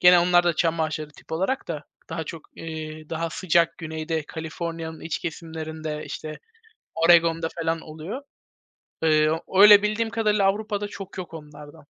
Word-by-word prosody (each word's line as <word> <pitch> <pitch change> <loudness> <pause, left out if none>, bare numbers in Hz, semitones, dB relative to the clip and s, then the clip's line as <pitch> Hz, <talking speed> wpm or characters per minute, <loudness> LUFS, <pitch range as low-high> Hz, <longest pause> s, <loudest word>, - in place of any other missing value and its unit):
gene 180 0 +8
onlar 175 0 +4
da 170 -2 +2
çam 165 -1 +1
ağaçları 155 -1 -2
tip 150 - -15
olarak 190 +11 -1
da 155 -3 -4 0.3
daha 160 - -3
çok, 160 +1 -9
eee, 155 -1 -7
daha 165 0 -2
sıcak 170 -1 +2
güneyde, 160 0 -3
Kaliforniya'nın 160 0 -5
iç 165 - -3
kesimlerinde, 160 -2 -5
işte, 155 -1 -6 0.6
Oregon'da 165 0 +5
falan 165 0 0
oluyor. 160 - -7 0.8
Iıı, 155 0 +3 0.2
öyle, 205 +1 +10
bildiğim 215 +2 0
kadarıyla 210 -3 +2
Avrupa'da 205 +1 0
çok 195 -1 -9
yok 175 -2 -6
onlardan. 150 0 -11
165 Hz, 145 wpm, -25 LUFS, 155-180 Hz, 0.8 s, öyle